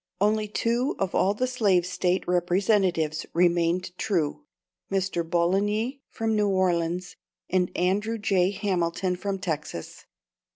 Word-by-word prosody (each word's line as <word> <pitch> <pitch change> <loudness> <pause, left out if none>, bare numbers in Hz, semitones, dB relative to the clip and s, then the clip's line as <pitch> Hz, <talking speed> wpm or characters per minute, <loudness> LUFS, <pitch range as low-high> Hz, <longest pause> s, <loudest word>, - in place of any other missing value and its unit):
Only 210 +2 +2
two 235 +5 0
of 195 -2 -2
all 200 +2 +2
the 255 - 0
Slave 205 -9 +2
State 185 0 -1
representatives 180 -3 +1
remained 175 +1 +2
true 175 - -1 0.5
Mr. 190 -3 0
Bouligny 205 +10 0
from 225 -1 -1
New 210 -1 +2
Orleans, 180 -2 0 0.3
and 180 -1 +2
Andrew 205 +6 +1
J. 190 -3 +2
Hamilton 185 -2 -1
from 195 +2 -3
Texas. 155 - -5
185 Hz, 120 wpm, -26 LUFS, 175-205 Hz, 0.5 s, Only